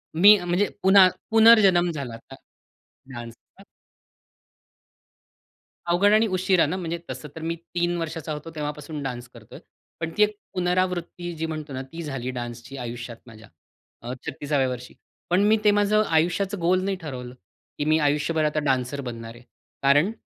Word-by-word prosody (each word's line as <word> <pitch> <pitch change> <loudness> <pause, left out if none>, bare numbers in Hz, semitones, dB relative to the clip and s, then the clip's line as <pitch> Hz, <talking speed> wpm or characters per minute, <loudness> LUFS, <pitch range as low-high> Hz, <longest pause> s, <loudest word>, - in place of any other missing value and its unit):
मी 205 +5 +8
अ, 175 - -6
म्हणजे 180 +4 +1 0.2
पुन्हा 190 0 +8 0.2
पुनर्जन्म 215 -6 +6
झाला 140 -7 -5
आता, 115 +4 -12 0.8
डान्सचा. 120 -1 -11 2.2
अवघड 180 +4 +3
आणि 220 +1 +4
उशिरा 185 -2 +2
ना? 160 - -2
म्हणजे, 170 -2 -3
तसं 150 - -6
तर 160 - -7
मी 165 +1 -2 0.2
3 175 0 0
वर्षाचा 165 -1 -4
होतो 150 +2 -7
तेव्हापासून 150 0 -5
डान्स 125 -2 -5
करतोय. - - -13 0.4
पण 165 -1 -3
ती 210 - +6
एक 210 0 0 0.2
पुनरावृत्ती 180 -1 -1
जी 160 +1 -3
म्हणतो 155 -3 -6
ना, 130 - -4
ती 165 +6 -9
झाली 135 -4 -4
डान्सची 120 +2 -7
आयुष्यात 120 -1 -6
माझ्या. 110 -2 -14 0.5
अ, 120 +2 -5
36 140 -1 -1
वर्षी. 125 0 -7 0.4
पण 180 +2 +3
मी 215 +1 +4
ते 210 - +6
माझं 205 +1 +3
आयुष्याचं 180 +5 +1
गोल 180 +2 +2
नाही 195 0 -1
ठरवलं, 125 -5 -7 0.4
की 145 - -2
मी 155 +1 +3
आयुष्यभर 150 +2 +1
आता 150 0 0
डान्सर 135 +1 0
बनणार 115 -2 -7
आहे. 120 - -15 0.4
कारण, 145 +8 +4
160 Hz, 155 wpm, -24 LUFS, 135-185 Hz, 2.2 s, मी